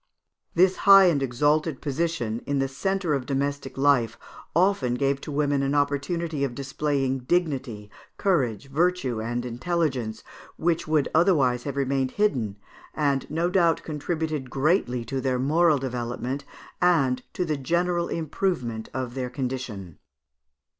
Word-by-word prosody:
This 185 +2 +4
high 195 -1 +8
and 170 -6 +3
exalted 145 +3 +1
position, 145 -6 -2
in 145 - 0
the 135 0 +1
centre 185 +4 -1
of 135 -3 -2
domestic 140 -1 -2
life, 135 -5 +3 0.4
often 170 -9 +2
gave 135 +1 0
to 155 - -7
women 145 -1 +1
an 140 +1 0
opportunity 145 +2 0
of 130 -3 -2
displaying 135 -1 -1
dignity, 130 -8 -1 0.3
courage, 135 - 0
virtue, 155 -7 +1
and 120 +2 -3
intelligence, 125 -3 -2 0.3
which 170 -1 0
would 155 -2 +2
otherwise 140 -8 +3
have 140 -2 -3
remained 135 -1 0
hidden, 130 - +1 0.4
and, 140 -3 0
no 165 +3 0
doubt, 170 -3 +3
contributed 155 -2 -3
greatly 135 - +1
to 135 +1 -3
their 130 -1 0
moral 155 +4 +3
development, 125 +1 -4 0.4
and 140 -8 +3
to 180 - -1
the 155 -2 -1
general 170 +4 0
improvement 150 - -2
of 130 -2 -3
their 130 -1 -3
condition. 125 - -5
140 Hz, 135 wpm, -25 LUFS, 125-165 Hz, 0.4 s, high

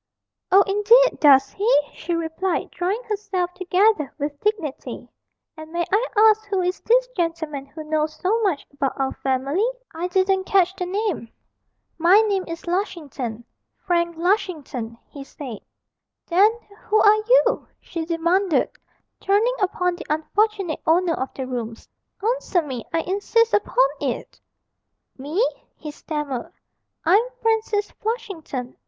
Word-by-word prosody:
'Oh, 390 +2 +7
indeed, 445 +5 +4
does 275 -3 +6
he?' 410 -6 +3
she 345 +2 -3
replied, 335 +2 -2
drawing 390 +7 -2
herself 400 -5 -2
together 370 -3 +2
with 290 -1 -4
dignity; 395 -9 -3 0.5
'and 315 -1 -10
may 345 0 -1
I 445 +5 +2
ask 435 0 +6
who 395 -1 0
is 360 +1 -1
this - - +3
gentleman 330 - -3
who 310 +3 -9
knows 310 0 -1
so 430 +5 0
much 375 -9 0
about 275 -1 -2
our 270 -1 0
family 275 - 0 0.2
I 335 +2 -3
didn't 380 +1 +1
catch 380 -1 +3
the 360 - -3
name?' 385 - -2 0.7
'My 350 +5 +6
name 400 -4 0
is 330 0 -6
Lushington 300 - -3 0.4
Frank 340 -2 0
Lushington,' 320 - -1
he 280 - -9
said. 260 -6 -8 0.7
'Then 385 +5 +5 0.3
who 430 +1 +3
are 430 +1 +5 0.2
you?' - - -1
she 330 - -5
demanded, 340 +2 +1 0.5
turning 420 +5 +2
upon 360 -2 0
the - - -9
unfortunate 385 +3 0
owner 340 +1 +3
of 265 -4 -3
the 265 - -4
rooms; 235 -3 -6 0.4
'answer 445 -6 +1
me, 260 -5 -5
I 330 - +1
insist 410 +6 +1
upon - - +3
it!' - - -4 0.8
'Me?' 320 - +1 0.3
he 300 - -8
stammered, 295 -5 -5 0.5
'I'm 380 +6 +6 0.2
Francis 440 -2 +1
Flushington. 345 - -5
355 Hz, 135 wpm, -22 LUFS, 305-410 Hz, 0.8 s, Oh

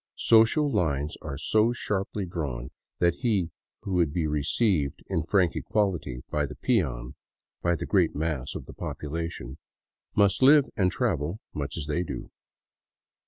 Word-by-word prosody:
Social 115 +7 +5
lines 75 - 0
are 70 - -5
so 110 +10 +2
sharply 100 -3 -2
drawn 70 -8 -4 0.3
that 85 -1 +2
he 105 -9 +1 0.3
who 95 - -4
would 85 -5 +2
be 80 +1 0
received 75 - +1
in 80 - -1
frank 90 +1 +2
equality 90 - -1
by 75 -1 +1
the - - -9
peon, 65 - 0 0.5
by 85 0 +2
the - - -4
great - - +2
mass 75 -4 -2
of - - -6
the - - -11
population, 75 -4 -5 0.6
must 100 +1 +3
live 140 +1 +7
and 95 -2 +2
travel 90 - -1
much 70 +1 -4
as 80 - -3
they 75 +3 0
do. 90 - -6
85 Hz, 150 wpm, -27 LUFS, 75-100 Hz, 0.6 s, live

